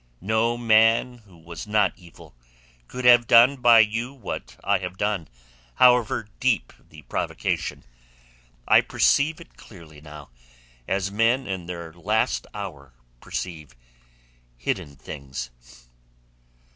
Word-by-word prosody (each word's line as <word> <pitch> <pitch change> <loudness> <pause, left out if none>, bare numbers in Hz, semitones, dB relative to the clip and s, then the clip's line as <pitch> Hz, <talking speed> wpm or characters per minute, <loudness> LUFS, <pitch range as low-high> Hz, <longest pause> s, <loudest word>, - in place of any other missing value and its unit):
"No 110 +4 0
man 115 +1 +3
who 90 -3 -18
was 85 +4 -10
not 105 0 +2
evil 85 -8 -17 0.5
could 125 0 -7
have 120 -1 +6
done 125 +4 +6
by 120 -2 +6
you 115 +4 -2
what 130 -7 -8
I - - +1
have 90 0 -7
done, 100 -5 -2 0.5
however 125 -3 +3
deep 130 -3 0 0.2
the 75 -1 -15
provocation. - - -3 0.8
I - - +6
perceive 155 +3 +1
it 170 - -16
clearly 80 -7 -15
now—as - - -8
men 115 +5 +1
in 95 -3 -5
their 85 -2 -7
last 105 +6 -1
hour 75 -11 -9 0.2
perceive 80 -6 -7 0.8
hidden 70 +4 -4
things." 65 -3 -8
100 Hz, 115 wpm, -24 LUFS, 75-115 Hz, 0.8 s, have